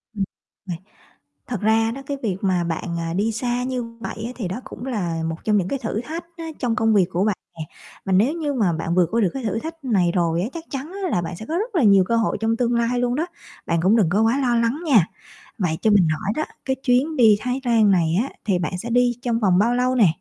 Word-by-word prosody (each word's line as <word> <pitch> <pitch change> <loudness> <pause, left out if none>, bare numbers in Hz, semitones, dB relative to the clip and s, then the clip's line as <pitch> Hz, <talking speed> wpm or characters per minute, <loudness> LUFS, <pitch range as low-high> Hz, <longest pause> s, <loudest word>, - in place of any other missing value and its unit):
Ừm. 200 - 0 0.4
Này, 170 -3 -5 0.7
thật 240 -6 -4
ra 225 +1 +3
đó 275 +3 -7
cái 280 -1 -3
việc 195 -4 -1
mà 185 -3 +1
bạn, 170 +1 -3
à, 165 0 -3
đi 210 +5 +1
xa 245 +2 -1
như 255 -1 -2 0.2
vậy 220 - -5
á 245 - -5
thì 220 -7 -3
đó 195 +8 -5
cũng 245 - -9
là 175 -9 -2
một 160 0 -2
trong 210 -1 +3
những 185 -2 0
cái 275 - -2
thử 220 -1 -3
thách 325 +6 -6
á 330 - -6 0.2
trong 240 -3 0
công 225 -2 +2
việc 185 -3 +4
của 185 +3 +1
bạn 210 -2 +1 0.2
nè, 160 - -4 0.4
và 190 - 0
nếu 220 +10 +4
như 305 -4 -2
mà 200 -9 +1
bạn 165 +2 -2
vượt 180 -2 +4
qua 230 - +2
được 190 - +3
cái 265 -2 -5
thử 220 +1 -1
thách 325 +1 -8
này 190 -8 +2
rồi 170 -2 +1
á, 195 - -1
chắc 335 - -6
chắn 275 +4 -5
á 365 - 0
là 175 - +1
bạn 170 +1 -5
sẽ 220 - -8
có 325 - -1
rất 435 +3 -3
là 325 - +3
nhiều 200 -3 +6
cơ 230 - +1
hội 225 - +1
trong 225 +1 +1
tương 240 0 +1
lai 235 +1 +1
luôn 245 0 0
đó, 320 +4 -1 0.4
bạn 170 -1 +1
cũng 195 +6 +4
đừng 195 -8 +3
có 200 +4 +2
quá 230 +5 +2
lo 245 -2 +2
lắng 235 +5 +1
nha. 230 - +5 0.5
Vậy 175 -7 0
cho 220 - +3
mình 195 -5 +5
hỏi 185 +6 -2
đó 310 - 0 0.2
cái 265 - 0
chuyến 270 +5 +2
đi 220 -4 +6
Thái 250 +4 -2
Lan 225 -4 +4
này 170 -3 +2
á 275 - -5 0.2
thì 190 -4 +1
bạn 180 +1 -2
sẽ 230 +6 -6
đi 245 +1 +3
trong 235 -2 0
vòng 190 -5 +3
bao 235 +4 +3
lâu 255 +1 +1
nè? 220 -6 +6
225 Hz, 275 wpm, -22 LUFS, 185-250 Hz, 0.7 s, nhiều